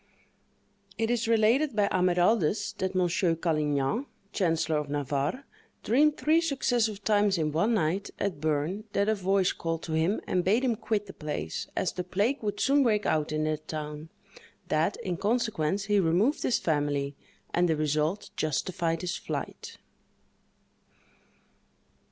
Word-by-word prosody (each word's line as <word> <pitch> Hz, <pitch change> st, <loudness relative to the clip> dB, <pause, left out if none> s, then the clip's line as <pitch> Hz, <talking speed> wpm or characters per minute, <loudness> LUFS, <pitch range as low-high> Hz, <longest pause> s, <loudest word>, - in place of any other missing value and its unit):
It 225 Hz, 0 st, 0 dB
is 235 Hz, -2 st, 0 dB
related 230 Hz, +5 st, +3 dB
by 205 Hz, -1 st, +3 dB
Amyraldus, 185 Hz, +3 st, +2 dB
that 190 Hz, 0 st, -2 dB
Monsieur 175 Hz, -1 st, +2 dB
Calignan, 155 Hz, -, 0 dB, 0.3 s
chancellor 165 Hz, -3 st, +1 dB
of 150 Hz, -1 st, -3 dB
Navarre, 145 Hz, -, -2 dB, 0.4 s
dreamed 295 Hz, +6 st, +3 dB
three 320 Hz, +2 st, +3 dB
successive 240 Hz, -9 st, 0 dB
times 205 Hz, -2 st, +3 dB
in 155 Hz, -2 st, 0 dB
one 210 Hz, +10 st, +2 dB
night, 185 Hz, +2 st, 0 dB
at 190 Hz, -7 st, -3 dB
Berne, 155 Hz, +7 st, -1 dB
that 200 Hz, +1 st, +1 dB
a 220 Hz, -, +3 dB
voice 195 Hz, -2 st, +1 dB
called 165 Hz, -1 st, -4 dB
to 160 Hz, -, -4 dB
him 165 Hz, +6 st, +1 dB
and 180 Hz, -1 st, 0 dB
bade 215 Hz, +8 st, +2 dB
him 245 Hz, -3 st, +2 dB
quit 215 Hz, -1 st, -2 dB
the 195 Hz, -, -10 dB
place, 145 Hz, -, -4 dB
as 185 Hz, -, 0 dB
the 180 Hz, -, -4 dB
plague 200 Hz, +10 st, 0 dB
would 205 Hz, -2 st, -3 dB
soon 280 Hz, +1 st, +3 dB
break 215 Hz, -5 st, +2 dB
out 155 Hz, -1 st, +1 dB
in 155 Hz, 0 st, 0 dB
that 155 Hz, 0 st, -2 dB
town; 150 Hz, 0 st, -6 dB, 0.6 s
that, 160 Hz, +6 st, +1 dB
in 180 Hz, -2 st, -2 dB
consequence, 205 Hz, -5 st, 0 dB
he 205 Hz, 0 st, +2 dB
removed 190 Hz, -, +2 dB
his 245 Hz, -, +2 dB
family, 145 Hz, -3 st, -1 dB, 0.4 s
and 175 Hz, 0 st, +2 dB
the 160 Hz, -, +3 dB
result 155 Hz, +6 st, -1 dB
justified 165 Hz, +2 st, -1 dB
his 180 Hz, +1 st, -2 dB
flight. -, -, -6 dB
185 Hz, 150 wpm, -28 LUFS, 155-215 Hz, 0.6 s, related